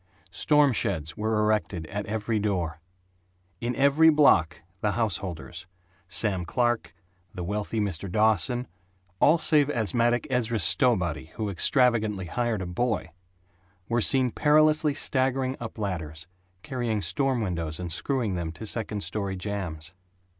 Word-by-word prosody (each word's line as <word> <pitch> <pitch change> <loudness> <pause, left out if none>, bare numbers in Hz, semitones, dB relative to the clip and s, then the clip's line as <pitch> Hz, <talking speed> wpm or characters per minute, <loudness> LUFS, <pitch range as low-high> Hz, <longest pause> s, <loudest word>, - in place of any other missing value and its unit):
Storm 150 - +3
sheds 80 -7 -2
were 110 +1 -1
erected 105 -6 0
at 105 +4 -5
every 110 +1 -1
door. 90 -6 -2 0.8
In 120 +1 -3
every 140 +4 +5
block 85 - +3 0.2
the 105 +1 0
householders, 90 -5 -3 0.4
Sam 95 0 +1
Clark, 120 +5 -1 0.4
the 90 - -5
wealthy 105 +4 -3
Mr. 95 -3 -2
Dawson, 110 +4 +1 0.5
all 160 +3 +5
save 150 -3 +4
asthmatic 120 - +1
Ezra 120 -2 0
Stowbody 85 - +1
who 110 -2 -3
extravagantly 110 - +2
hired 115 +1 -2
a - - -5
boy, 90 0 -2 0.8
were 120 0 0
seen 130 +1 +4
perilously 155 +1 +3
staggering 130 -2 0
up 115 -1 -7
ladders, 80 -6 -5 0.4
carrying 120 -5 -2
storm 130 - 0
windows 85 -5 -3
and 90 -2 -5
screwing 115 - -1
them 85 -2 -3
to 110 - -8
second 105 -2 -2
story 100 -3 -3
jambs. 90 -5 -5
105 Hz, 130 wpm, -26 LUFS, 90-125 Hz, 0.8 s, every